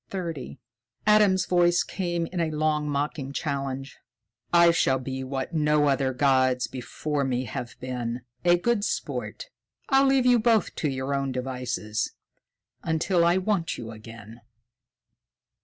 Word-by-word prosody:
Adam's 210 -3 +4
voice 175 -1 +3
came 175 -3 -2
in 180 +1 -5
a 165 - 0
last 155 0 0
mocking 145 -1 -2
challenge: 140 -2 -4 0.5
"I 170 0 +6
shall 165 -6 +2
be 130 0 -5
what 135 +4 -4
no 150 -1 +3
other 135 -1 +1
gods 130 -1 +2
before 140 +3 -3
me 130 -1 -1
have 120 +2 -6
been 125 -1 -4 0.2
a 175 0 +5
good 225 +3 0
sport. - - -4 0.4
I'll 270 -1 +5
leave 270 -2 +3
you 245 -1 +5
both 225 -1 +2
to 155 - 0
your 135 +1 -3
own 135 -1 -1
devices, 125 -4 -3 0.7
until 170 +2 +1
I 170 +2 +4
want 190 -3 -1
you 115 -2 -7
again." 115 +1 -12
145 Hz, 135 wpm, -26 LUFS, 130-175 Hz, 0.7 s, I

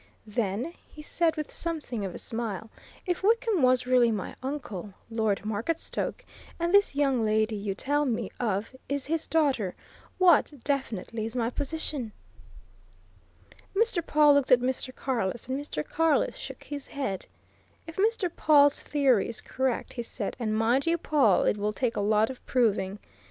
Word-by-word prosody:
"Then," 220 - -2
he 300 - -12
said, 330 +1 +1
with 305 -2 -4
something 305 -10 -2
of 190 -2 -4
a - - -4
smile, 225 -2 -4 0.3
"if 355 -2 -1
Wickham 445 -2 +2
was 255 -1 +4
really 250 -2 +4
my 210 -4 -3
uncle, 220 -9 -5 0.2
Lord 220 -3 0
Marketstoke, 220 +10 -3 0.3
and 340 +2 0
this 405 -7 +5
young 270 -5 +2
lady 215 0 +1
you 200 -1 -3
tell 290 +7 0
me 240 -5 -2
of 220 +1 -1
is 280 -1 -2
his 320 +2 -1
daughter 275 - +1 0.4
what, 365 -3 +5
definitely, 230 -6 -2
is 225 - -8
my 235 -1 0
position?" 285 -5 -3 1.6
Mr. 445 -4 +2
Pawle 300 -1 +5
looked 285 -2 +2
at 250 - +8
Mr. 255 +1 -2
Carless, 235 -5 -2
and 260 +1 -2
Mr. 150 - -4
Carless 325 -2 +1
shook - - -8
his 285 -2 -7
head. 265 -10 -4 0.6
"If 325 - -10
Mr. 425 -1 +2
Pawle's 290 -2 +5
theory 270 -8 +2
is 230 - -5
correct," 260 -2 -2
he 240 - -3
said, 230 -3 -5
"and 215 -2 -1
mind 240 +6 +2
you, 335 +1 +3
Pawle, 280 - +3
it - - +2
will 210 +1 -1
take 240 +1 -1
a - - 0
lot 215 +3 +3
of 255 - -12
proving. 210 -5 +1
255 Hz, 160 wpm, -28 LUFS, 220-300 Hz, 1.6 s, at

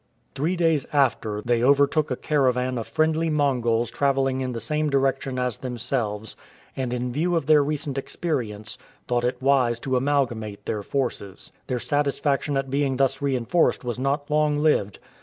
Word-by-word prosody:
Three 160 +7 -1
days 165 -5 +1
after, 110 -7 +1
they 120 -1 +1
overtook 140 +3 +3
a 130 - -1
caravan 130 -4 0
of 115 - -6
friendly 160 +1 +1
Mongols 120 -6 +1
travelling 135 0 +1
in 130 -1 -2
the 115 - -4
same 150 +7 -1
direction 135 -1 0
as 125 -3 -1
themselves, 115 -4 -3 0.4
and 130 -2 -2
in 125 0 -2
view 170 +7 0
of 165 -4 0
their 150 -1 +5
recent 145 -1 -2
experience, 115 -9 -4 0.3
thought 120 -1 0
it 125 +1 -1
wise 130 -3 +2
to 130 -2 -1
amalgamate 125 -6 -1
their 105 - -2
forces. 105 -5 -4 0.2
Their 125 - -1
satisfaction 145 +1 0
at 135 -1 -2
being 140 -1 0
thus 135 0 +1
reinforced 140 +4 +1
was 125 0 -3
not 140 +2 -1
long 150 -1 +2
lived. 145 -10 +1
135 Hz, 160 wpm, -24 LUFS, 120-145 Hz, 0.4 s, their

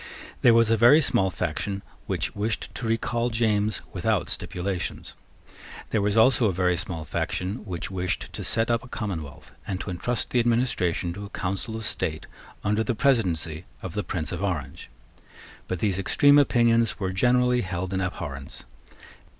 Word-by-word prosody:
There 120 -2 +6
was 115 -1 +4
a 115 - +4
very 120 +7 +7
small 95 -10 +2
faction 95 +3 -3 0.2
which - - -2
wished 105 +2 -2
to 115 - -4
recall 115 +1 0
James 110 -2 +1
without - - 0
stipulations. 90 0 -3 0.8
There 110 - +2
was 105 +2 +1
also 120 0 +5
a - - +2
very 90 0 +1
small 90 -4 -4
faction 90 - -2
which 90 -2 -5
wished 90 -1 -3
to - - -5
set 115 +1 +2
up 115 0 +1
a - - -11
commonwealth, 90 - -6
and 95 -2 -2
to 95 - -5
entrust 120 +7 -1
the 125 - +3
administration 115 -8 +1
to 100 +3 -7
a - - -10
council 100 +4 -3
of 110 -1 -4
state 80 -5 -2 0.4
under 105 +2 +1
the 120 0 -1
presidency 90 - +1 0.2
of 95 - -5
the 105 - -2
Prince 80 -3 -3
of 85 - -4
Orange. 80 -9 -3 0.8
But 90 - -2
these 95 +1 0
extreme 145 +9 +5
opinions 115 -4 +3
were 95 -2 -1
generally 125 +4 +3
held 95 0 -3
in 95 - 0
abhorrence. 70 -7 -5
100 Hz, 165 wpm, -26 LUFS, 90-115 Hz, 0.8 s, very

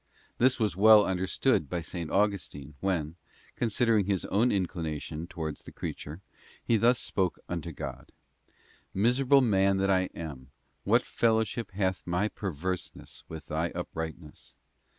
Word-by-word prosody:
This 130 +2 +4
was 105 -7 +1
well 105 +1 +7
understood 95 - +1
by 90 - -2
S. 85 - -6
Augustine 85 -5 -1
when, 85 -4 -1 0.4
considering 115 -3 +2
his 100 -3 0
own 115 +5 +2
inclination 80 -4 -3
towards 80 -4 -5
the - - -11
creature, 80 +5 -6 0.4
he 115 - +2
thus 120 +3 +4
spoke 95 -3 -1
unto 85 -1 -4
God: - - -7 0.8
'Miserable 125 +7 +4
man 100 -5 +3
that 95 0 +2
I 95 -1 +2
am, 70 -6 -7 0.4
what - - +3
fellowship 110 0 +1
hath 95 -2 0
my 90 +5 +1
perverseness 90 -2 -5
with 80 -1 -8
Thy 80 +3 -1
uprightness? 80 -1 -6
95 Hz, 130 wpm, -29 LUFS, 80-105 Hz, 0.8 s, well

